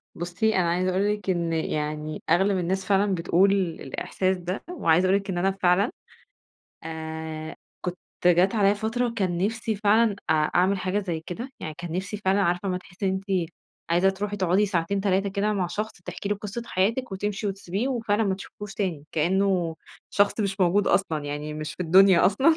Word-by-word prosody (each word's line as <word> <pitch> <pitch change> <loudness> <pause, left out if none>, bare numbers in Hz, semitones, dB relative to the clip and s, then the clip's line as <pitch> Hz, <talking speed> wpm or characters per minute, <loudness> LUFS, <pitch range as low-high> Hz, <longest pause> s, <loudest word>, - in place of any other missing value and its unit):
بُصّي، 180 +6 0
أنا 175 -2 +2
عايزة 180 +2 +1
أقول 195 +3 +1
لِك 205 -2 -6
إن 170 -2 0
يعني 155 -1 -3
أغلب 190 +4 +3
الناس 185 +2 -1
فعلًا 200 0 +2
بتقول 180 +3 +3
الإحساس 185 +1 -1
ده، 180 +2 -4
وعايزة 180 - +3
أقول 190 +2 +4
لِك 200 0 -11
إن 180 - -2
أنا 190 +2 +2
فعلًا، 190 +2 +2 0.9
آآ 160 -1 -6 0.3
كنت 180 0 -4 0.3
جات 180 +3 +4
عليّا 205 -2 +4
فترة 230 +3 -1
كان 185 -5 0
نفسي 220 +3 -1
فعلًا 210 +1 +3
أ - - +7
أعمل 180 +5 +2
حاجة 185 +2 -1
زي 175 -6 -3
كده، 235 +9 -5
يعني 155 - -5
كان 175 -2 -6
نفسي 190 +4 -3
فعلًا 200 -1 +1
عارفة 180 +1 0
أمَّا 180 -1 -1
تحسّي 185 +2 -6
إن - - +2 0.2
أنتِ 180 -4 +1 0.4
عايزة 175 +3 +4
تروحي 205 +2 -4
تقعدي 190 +2 +2
ساعتين، 195 +1 0
3 195 0 +1
كده 200 +2 0
مع 190 -3 0
شخص 210 +5 -3
تحكي 200 - -5
له 205 - 0
قصة 210 +3 -5
حياتِك 225 +5 0
وتمشي 205 +2 -2
وتسبيه 195 +4 -2
وفعلًا 225 -4 0
ما 195 -2 +1
تشوفيهوش 205 +1 -9
تاني، 175 -9 -2
كإنّه 175 0 +1 0.3
شخص 205 +2 +2
مش 195 -2 -2
موجود 190 +3 +3
أصلًا، 160 -6 +1
يعني 150 +1 -4
مش 155 +1 -5
في - - -15
الدنيا 185 +1 +6
أصلًا، 260 - +4
190 Hz, 185 wpm, -25 LUFS, 175-205 Hz, 0.9 s, أ